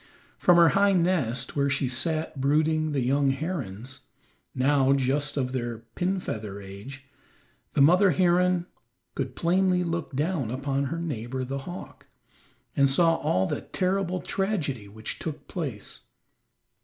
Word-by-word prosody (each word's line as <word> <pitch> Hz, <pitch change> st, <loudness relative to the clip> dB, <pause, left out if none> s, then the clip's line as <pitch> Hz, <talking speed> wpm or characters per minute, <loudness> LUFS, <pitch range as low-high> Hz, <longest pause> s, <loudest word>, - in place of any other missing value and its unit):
From 175 Hz, -1 st, +5 dB
her 170 Hz, -1 st, +7 dB
high 200 Hz, 0 st, +3 dB
nest, 155 Hz, -9 st, 0 dB
where 140 Hz, -1 st, +2 dB
she 140 Hz, -1 st, +1 dB
sat 155 Hz, +3 st, -1 dB
brooding 155 Hz, +2 st, +2 dB
the 140 Hz, -2 st, 0 dB
young 135 Hz, +3 st, +2 dB
herons, 135 Hz, -, -4 dB, 0.6 s
now 135 Hz, +1 st, +3 dB
just 140 Hz, +2 st, 0 dB
out -, -, +2 dB
of 125 Hz, 0 st, -2 dB
their 120 Hz, -3 st, -3 dB, 0.2 s
pin 190 Hz, +1 st, 0 dB
feather 105 Hz, -, -5 dB
age, 100 Hz, +8 st, -10 dB, 0.7 s
the -, -, +2 dB
mother 180 Hz, +6 st, +6 dB
heron 180 Hz, 0 st, +2 dB, 0.5 s
could 130 Hz, -2 st, -4 dB
plainly 180 Hz, +1 st, +2 dB
look 170 Hz, -4 st, -3 dB
down 150 Hz, -4 st, -1 dB
upon 135 Hz, +2 st, -1 dB
her 165 Hz, +5 st, -3 dB
neighbor 130 Hz, -6 st, -4 dB
the 135 Hz, +2 st, -4 dB
hawk, 175 Hz, -, -9 dB, 0.7 s
and 140 Hz, 0 st, +4 dB
saw 165 Hz, +4 st, +4 dB
all 95 Hz, +1 st, +1 dB
the -, -, -3 dB
terrible 185 Hz, -1 st, -1 dB
tragedy 160 Hz, -, -2 dB
which 110 Hz, +2 st, -7 dB
took 155 Hz, -2 st, -6 dB
place. 135 Hz, -, -5 dB
145 Hz, 145 wpm, -26 LUFS, 130-175 Hz, 0.7 s, her